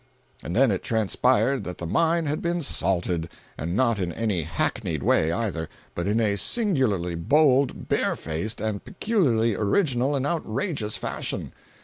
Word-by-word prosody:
And 85 Hz, -, -4 dB
then 130 Hz, -1 st, +4 dB
it 95 Hz, -, -1 dB
transpired 125 Hz, +4 st, +1 dB
that 90 Hz, -, -6 dB
the 85 Hz, -, -6 dB
mine 165 Hz, -, +1 dB
had 150 Hz, +1 st, -2 dB
been 170 Hz, 0 st, -1 dB
"salted"—and 85 Hz, -, -2 dB
not 115 Hz, -3 st, +2 dB
in 90 Hz, -2 st, -1 dB
any 105 Hz, -1 st, -1 dB
hackneyed 80 Hz, 0 st, -2 dB
way, 80 Hz, -, +3 dB
either, 85 Hz, -4 st, -2 dB, 0.2 s
but 85 Hz, +2 st, -3 dB
in 105 Hz, +3 st, +2 dB
a 105 Hz, -3 st, +1 dB
singularly 130 Hz, -, +1 dB
bold, 135 Hz, -, +2 dB
barefaced 80 Hz, +9 st, -1 dB
and 110 Hz, -2 st, -2 dB
peculiarly 125 Hz, -, +1 dB
original 130 Hz, -, +1 dB
and 135 Hz, -1 st, -1 dB
outrageous 140 Hz, -, -2 dB
fashion. -, -, -3 dB
110 Hz, 140 wpm, -25 LUFS, 90-140 Hz, 0.2 s, then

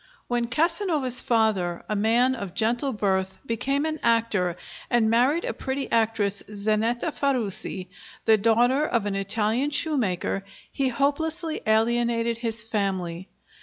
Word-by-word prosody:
When 240 Hz, -1 st, 0 dB
Casanova's 310 Hz, -, +1 dB
father, 210 Hz, -7 st, +1 dB
a 215 Hz, -, -1 dB
man 230 Hz, +5 st, +3 dB
of 200 Hz, -7 st, -6 dB
gentle 235 Hz, +6 st, +1 dB
birth, 190 Hz, -3 st, -1 dB
became 275 Hz, +5 st, -1 dB
an 315 Hz, -1 st, -2 dB
actor 220 Hz, -7 st, +1 dB, 0.3 s
and 225 Hz, -2 st, +3 dB
married 260 Hz, +8 st, +3 dB
a -, -, -2 dB
pretty 270 Hz, +1 st, -4 dB
actress, 220 Hz, -3 st, +1 dB
Zanetta 220 Hz, +7 st, 0 dB
Farusi, 235 Hz, -10 st, -1 dB, 0.4 s
the 220 Hz, -, +6 dB
daughter 235 Hz, +6 st, +3 dB
of 235 Hz, -8 st, 0 dB
an 205 Hz, -, -1 dB
Italian 215 Hz, +7 st, 0 dB
shoemaker, 230 Hz, -, 0 dB, 0.3 s
he 270 Hz, -1 st, 0 dB
hopelessly 310 Hz, +5 st, -1 dB
alienated 230 Hz, +1 st, +1 dB
his 225 Hz, -2 st, -1 dB
family. 190 Hz, -5 st, -3 dB
230 Hz, 130 wpm, -25 LUFS, 205-265 Hz, 0.4 s, the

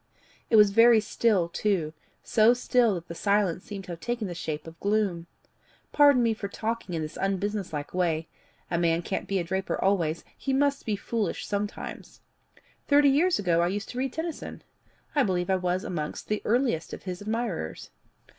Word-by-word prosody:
It -, -, +4 dB
was 210 Hz, -2 st, +7 dB
very 230 Hz, +2 st, +7 dB
still 210 Hz, -4 st, +1 dB
too 170 Hz, -4 st, -1 dB, 0.3 s
so 225 Hz, +2 st, +4 dB
still 245 Hz, -3 st, +2 dB
that 170 Hz, 0 st, -7 dB
the -, -, -6 dB
silence 200 Hz, 0 st, +1 dB
seemed 200 Hz, -2 st, -7 dB
to 180 Hz, -, -8 dB
have 170 Hz, -, -6 dB
taken 240 Hz, 0 st, -3 dB
the 180 Hz, -, -4 dB
shape 155 Hz, -3 st, -5 dB
of 165 Hz, 0 st, -11 dB
gloom. 200 Hz, -5 st, 0 dB, 0.6 s
Pardon 285 Hz, -4 st, +5 dB
me 230 Hz, -1 st, +2 dB
for 215 Hz, -2 st, -5 dB
talking 220 Hz, -2 st, -4 dB
in 160 Hz, -, -2 dB
this 155 Hz, -, -7 dB
unbusiness 195 Hz, 0 st, -1 dB
like 145 Hz, -2 st, -5 dB
way: 165 Hz, -3 st, 0 dB, 0.4 s
a 170 Hz, -, +1 dB
man 170 Hz, 0 st, +1 dB
can't 190 Hz, -, -3 dB
be 195 Hz, -, 0 dB
a 180 Hz, -, 0 dB
draper 190 Hz, +3 st, -2 dB
always; 170 Hz, -5 st, +1 dB
he 270 Hz, -, -2 dB
must 280 Hz, -1 st, +1 dB
be 215 Hz, -, +1 dB
foolish 205 Hz, -1 st, -2 dB
sometimes. 205 Hz, 0 st, -5 dB, 0.7 s
Thirty 285 Hz, 0 st, +5 dB
years 335 Hz, +7 st, +3 dB
ago 170 Hz, -4 st, +2 dB
I 170 Hz, -, +2 dB
used 205 Hz, +3 st, -3 dB
to 250 Hz, -, -5 dB
read 265 Hz, -1 st, -1 dB
Tennyson. 320 Hz, -1 st, -5 dB, 0.5 s
I 290 Hz, -, +3 dB
believe 185 Hz, -5 st, 0 dB
I -, -, +4 dB
was 180 Hz, 0 st, -1 dB
amongst 155 Hz, -4 st, -5 dB
the 210 Hz, 0 st, 0 dB
earliest 235 Hz, -, 0 dB
of -, -, -8 dB
his 185 Hz, -1 st, -5 dB
admirers." 215 Hz, -, -3 dB
200 Hz, 185 wpm, -27 LUFS, 175-230 Hz, 0.7 s, was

